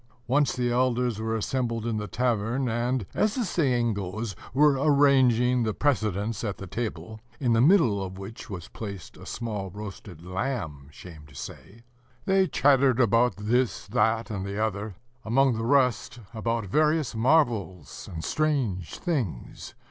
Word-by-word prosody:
Once 140 +4 +2
the 125 - -2
village - - 0
elders 125 -3 0
were 110 0 -1
assembled 115 0 -2
in 115 -2 -1
the 105 0 -4
tavern, 120 +2 0
and, 120 0 -1
as 215 0 +1
the 250 -4 0
saying 125 - +1
goes, 100 +1 -4 0.2
were 150 +4 +5
arranging 130 -4 +4
the 110 -2 -1
precedence 110 -6 0
at 105 -4 -3
the 100 - -7
table, 110 0 -5 0.2
in 125 -4 +2
the 115 - +4
middle 130 - +4
of 95 0 -7
which 100 +4 -9
was 90 -4 -7
placed 100 -5 -8
a - - -12
small 105 -5 -4
roasted 95 -4 -9
lamb, 90 - -4
shame 75 -1 -12
to 75 - -18
say. 115 +10 -10 0.4
They 190 -1 +3
chattered 135 -5 +3
about 115 -2 +3
this, 120 +4 0
that, 110 +1 +1
and 100 -3 -3
the 100 +1 -5
other, 105 -2 -2 0.3
among 125 +2 +3
the 115 0 -3
rest 125 -3 +2 0.2
about 115 0 -2
various 150 - +1
marvels 110 - 0
and 80 -2 -6
strange 130 - -1
things. 125 - -4
115 Hz, 155 wpm, -26 LUFS, 100-130 Hz, 0.4 s, were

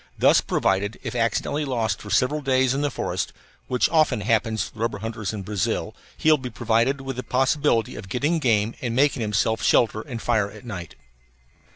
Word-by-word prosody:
Thus - - +5
provided, 100 +3 0
if - - -4
accidentally 120 +5 0
lost 115 -7 -1
for 105 - -9
several 145 +8 +2
days 130 -2 +2
in 140 - -1
the 145 - +1
forest - - -3 0.3
(which 125 - +2
often 155 -8 +2
happens 110 0 +1
to - - -11
the 110 - -15
rubber 115 -2 -1
hunters 110 -1 -4
in 105 -3 -5
Brazil), 100 -1 -2 0.2
he 155 - +3
will 155 - +5
be 130 -1 -5
provided 120 +4 +1
with 135 -2 -5
the - - -2
possibility 130 -2 +1
of 95 - -9
getting 145 - 0
game 115 -5 +2
and 120 -2 -2
making 140 -1 +2
himself 110 +1 0
shelter 110 -2 +3
and 120 -2 -7
fire 110 -4 +1
at 125 - -13
night. 90 -8 -7
115 Hz, 195 wpm, -24 LUFS, 110-135 Hz, 0.3 s, Thus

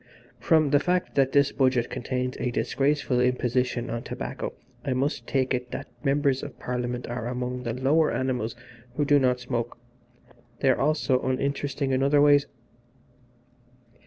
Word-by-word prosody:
From 155 -4 +3
the 145 - +5
fact 180 +4 0
that 135 -1 +2
this 140 0 +4
Budget 130 -3 +1
contains 125 0 -3
a 125 - 0
disgraceful 135 +1 0
imposition 125 0 0
on 115 - -3
tobacco - - -5 0.3
I 135 - -1
must 135 +3 -1
take 130 -1 +1
it 125 0 -2
that - - -6
Members 140 -2 +2
of 145 - -8
Parliament 125 0 -3
are 120 -1 -4
among 125 0 -3
the 120 -2 -3
lower 140 +6 +2
animals 125 -4 -2 0.4
who 145 - +1
do 145 0 +5
not 125 -2 +2
smoke 120 -1 -3 0.8
they 135 - +5
are - - 0
also 140 -3 +2
uninteresting 140 +1 -1
in 130 0 +1
other 140 +2 +4
ways." 145 0 +5
130 Hz, 155 wpm, -26 LUFS, 125-140 Hz, 0.8 s, the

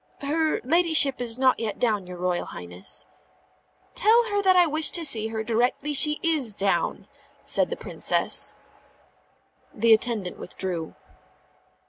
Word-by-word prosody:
"Her 310 +2 -1
ladyship 310 -2 +4
is 235 -1 -2
not 260 -1 +2
yet 220 -3 -4
down, 210 -6 -1
your 180 0 -9
Royal 180 0 -2
Highness." 90 +2 -4 0.9
"Tell 470 -1 +2
her 410 0 0
that 375 -2 +3
I 355 -1 +5
wish 310 0 +2
to 340 -2 0
see 220 -6 +3
her 220 0 -5
directly 245 +6 -1
she 300 +1 +5
is 295 - 0
down," 195 -1 -2 0.4
said - - +1
the - - -5
Princess. - - -2 1.2
The 230 +1 +3
attendant 220 -5 -1
withdrew. 175 -3 -6
245 Hz, 135 wpm, -24 LUFS, 210-315 Hz, 1.2 s, I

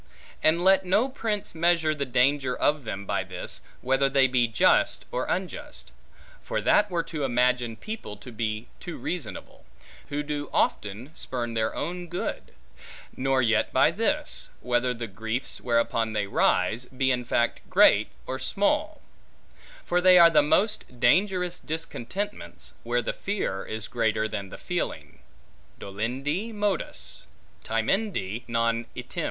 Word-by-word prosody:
And 165 +3 +3
let 190 0 +5
no 210 +8 +2
prince 225 -6 -3
measure 165 -1 +2
the 140 -3 -3
danger 130 +1 +2
of 145 -3 +1
them 100 -2 -5
by - - -1
this, - - -6 0.2
whether 135 +2 +2
they 135 -1 +4
be 125 -2 +3
just 115 0 +3
or 125 - -2
unjust: 290 +12 -4 0.5
for - - -2
that 210 0 +3
were 170 -2 0
to 155 -3 -5
imagine 125 -2 +1
people, 215 - -7
to 115 +5 -11
be 110 -1 -3
too 175 - -7
reasonable; 180 -3 -6 0.5
who 145 0 -2
do 145 0 -4
often 105 +7 -1
spurn 120 -6 -4
at - - -6
their 110 -1 -1
own 175 +3 -4
good: 175 +1 -5 0.6
nor 130 0 +1
yet 115 -2 +2
by - - +4
this, - - -1
whether 125 +1 +1
the 120 -1 -4
griefs 110 +4 -4
whereupon 115 -2 +1
they 105 -1 0
rise, 100 +4 +1
be 130 +1 0
in 125 -1 0
fact 120 -1 +1
great - - +6 0.2
or 130 0 -4
small: 300 - 0 0.8
for 180 0 +2
they 185 0 +7
are 170 -1 +8
the 150 -2 +6
most 155 - 0
dangerous 180 - +2
discontentments, 165 - -5
where 120 +1 0
the - - -2
fear 195 - -2
is 110 -1 -5
greater 110 -1 0
than 100 -3 -5
the - - -9
feeling. - - -4 0.6
Dolendi 135 - -3
modus, 205 -4 -3 0.4
timendi 115 - -1
non 115 0 0
item. - - -6
130 Hz, 145 wpm, -26 LUFS, 115-175 Hz, 0.8 s, are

